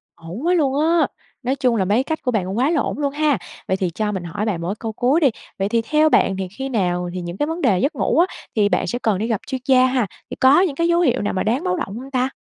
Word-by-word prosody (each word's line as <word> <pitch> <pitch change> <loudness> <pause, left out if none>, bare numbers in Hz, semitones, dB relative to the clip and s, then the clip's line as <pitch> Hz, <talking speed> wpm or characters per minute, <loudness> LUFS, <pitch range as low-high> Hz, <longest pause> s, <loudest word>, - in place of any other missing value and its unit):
Ổn 170 - -8
quá 355 - +3
luôn 285 -5 +1
á, 320 0 +3 0.4
nói 255 +3 0
chung 255 -3 +1
là 195 -4 +1
mấy 215 +7 +2
cách 315 +3 -3
của 250 - -1
bạn 210 -6 0
cũng 190 +3 -4
quá 260 +4 +2
là 320 -4 +2
ổn - - -3
luôn 280 -1 -1
ha. 295 -4 +2 0.3
Vậy 190 - 0
thì 185 -2 -1
cho 210 +5 -2
mình 190 -3 -4
hỏi 175 +5 -4
bạn 190 -6 -2
một 170 - -3
cái 195 - -2
câu 225 - -4
cuối 255 +8 +2
đi, 290 -5 +4 0.3
vậy 195 +1 0
thì 230 +1 +2
theo 305 +6 +3
bạn 195 -9 +3
thì 190 -1 -3
khi 270 0 -3
nào 180 -6 -1
thì 185 - -4
những 175 +2 -6
cái 295 - 0
vấn 330 +2 -4
đề 210 -9 +3
giấc 280 - 0
ngủ - - +1
á 345 - +6 0.3
thì 205 -2 +3
bạn - - 0
sẽ 245 - -2
cần 220 -5 +1
đi 215 +4 -2
gặp 225 -4 -1
chuyên 260 -2 -4
gia 255 -2 +5
ha? 255 -4 +1 0.2
Thì - - -6
có 270 +7 +5
những 335 -8 0
cái 335 +3 +1
dấu 340 0 +3
hiệu 260 -7 +2
nào 205 - -1
mà 185 - -1
đáng 245 +8 0
báo 365 -1 0
động 225 - -4
hông 270 +2 -10
ta? 255 0 +1
250 Hz, 315 wpm, -21 LUFS, 200-290 Hz, 0.4 s, á